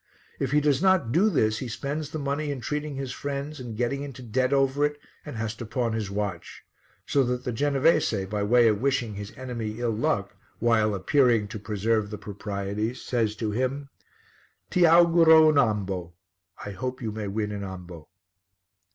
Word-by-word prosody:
If 135 - -1
he 150 +2 +3
does 145 -1 +2
not 190 -11 +3
do 190 - +4
this 110 - +1
he 130 - -4
spends 145 +5 -4
the 155 - -5
money 145 +1 -2
in 140 -2 -3
treating 150 +3 -3
his 135 -1 -4
friends 140 +1 -5
and 120 -4 -7
getting 125 +4 -1
into 135 -2 -8
debt 130 +3 0
over 135 +1 +2
it 150 0 0 0.2
and 150 - -8
has 110 0 -3
to 120 - -6
pawn 120 0 -1
his 110 -3 -2
watch. 100 -4 -4 0.4
So 140 - +2
that 125 0 -2
the 125 - -2
Genovese, 135 -5 +2
by 105 +2 -3
way 120 +3 +4
of 105 -1 +1
wishing 130 -5 0
his 100 0 -7
enemy 120 -4 -4
ill 120 -1 0
luck, 110 +1 -1 0.2
while 110 -3 +2
appearing 115 0 +2
to 110 - -6
observe 110 0 0
the 105 - -6
proprieties, 105 +2 -4
says 115 -4 -1
to 110 -1 -2
him 130 +5 -2 0.8
"Ti 180 -2 +5
auguro 165 -1 +7
un' 150 -2 +4
ambo." 95 -7 -1 0.5
("I 105 - -5
hope 130 +5 -4
you 110 - -2
may 105 -1 -5
win 105 +1 -2
an 100 -1 -5
ambo.") 90 -4 -9
120 Hz, 185 wpm, -26 LUFS, 105-140 Hz, 0.8 s, auguro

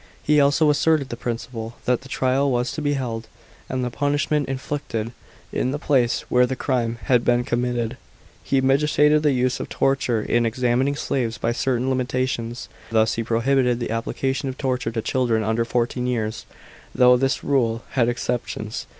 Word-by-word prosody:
He 150 0 +4
also 145 +2 +4
asserted 150 -1 +2
the - - -4
principle, 115 -1 -5
that 125 -1 +1
the 135 - -13
trial 130 +2 +1
was 125 -1 0
to 155 - -5
be 145 -1 +1
held, 115 -5 -3 0.4
and 130 -1 -2
the 125 - -2
punishment 145 +1 0
inflicted, 130 -4 -3 0.4
in 125 - 0
the 140 - -2
place 130 -5 +1
where 125 0 +3
the 130 - -2
crime 120 -3 -1
had 125 -2 +3
been 120 0 +2
committed. 120 0 -1 0.5
He 135 -1 +1
mitigated 150 +2 +3
the 150 -1 +3
use 125 -1 0
of - - -5
torture 135 -4 +1
in 120 +2 +1
examining 125 +4 +1
slaves 120 -5 -2
by 115 - 0
certain 125 +1 0
limitations. 130 -2 -2 0.2
Thus 110 0 +2
he 115 - -2
prohibited 125 +2 +1
the 120 - -3
application 130 +4 -2
of 130 - -6
torture 125 -4 -1
to 115 -1 -3
children 120 -4 +1
under 110 +2 0
fourteen 125 +1 -1
years, 110 -3 -2 0.5
though 125 0 +6
this 135 +2 0
rule 120 -5 +1
had 120 -3 +2
exceptions. 120 0 -3
125 Hz, 170 wpm, -23 LUFS, 115-135 Hz, 0.5 s, though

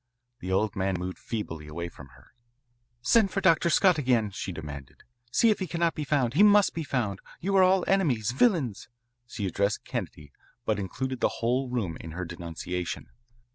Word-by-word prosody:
The 95 - -5
old 100 +2 +1
man 95 0 0
moved 90 +1 -5
feebly 80 -9 -5
away 85 +3 -5
from 70 -5 -12
her. 65 - -21 0.7
"Send 220 - +4
for 195 - -1
Dr. 170 -2 +4
Scott 180 -1 +4
again," 120 -6 +2
she 95 0 -5
demanded. 75 -5 -9 0.3
"See 230 - +4
if 210 - 0
he 190 - -2
cannot 170 -1 0
be 150 - -4
found. 135 -5 +1
He 165 - +4
must 205 -1 +6
be 165 - -3
found. 120 -9 -2 0.2
You 195 +3 -1
are - - +7
all 185 0 +4
enemies, 135 - +2
villains." 135 - +1 0.4
She 105 -3 -4
addressed 100 +3 0
Kennedy, 75 -2 -5 0.3
but 110 -2 0
included 130 +7 -3
the - - +3
whole 125 +3 0
room 100 -10 -2
in 80 - -8
her 90 +2 -4
denunciation. 85 +1 -5
115 Hz, 180 wpm, -27 LUFS, -, 0.7 s, are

